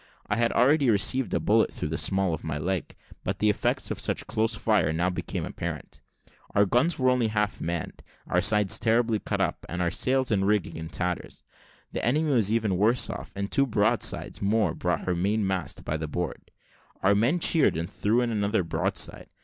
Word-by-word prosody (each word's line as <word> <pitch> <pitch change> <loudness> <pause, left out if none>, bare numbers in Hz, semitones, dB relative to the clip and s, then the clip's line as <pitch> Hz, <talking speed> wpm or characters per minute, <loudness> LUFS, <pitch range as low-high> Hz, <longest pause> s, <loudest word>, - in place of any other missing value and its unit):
I 105 - -1
had 115 0 +2
already 140 +2 +4
received 115 +5 +2
a - - +1
bullet 110 +2 +2
through 75 - -4
the 80 - -2
small 95 -3 +1
of - - -5
my 75 -2 -3
leg. 90 +3 -3 0.3
But - - -2
the 105 0 +3
effects - - -1
of - - -4
such - - -1
close 110 +1 -1
fire 105 -6 +1
now 85 +3 0
became 90 - -4
apparent: - - -6 0.5
our 100 - +5
guns 125 - +2
were 130 -1 +3
only 125 -3 +1
half 105 -1 -1
manned, 85 0 -4 0.2
our 90 - +1
sides 105 -1 +4
terribly 115 -1 +2
cut - - -3
up, - - -1
and 90 - -4
our 85 -1 0
sails 130 -1 +1
and 95 -2 +1
rigging 105 -3 0
in 80 0 -6
tatters. 90 0 -3 0.5
The - - -4
enemy 150 +5 +1
was 110 -6 +2
even 110 -5 0
worse 115 +4 +2
off, - - -8
and 100 0 -4
two 140 0 +2
broadsides 110 -2 0
more 105 +2 +1
brought - - -1
her 90 - -1
mainmast 95 0 -1
by 75 - -1
the 80 0 -4
board. 90 +4 -5 0.5
Our 95 +1 +5
men 120 +11 +2
cheered, 160 - +3
and 85 +1 -3
threw 110 +7 0
in 120 -1 -1
another 105 -2 0
broadside. 80 - -2
105 Hz, 200 wpm, -26 LUFS, 90-115 Hz, 0.5 s, our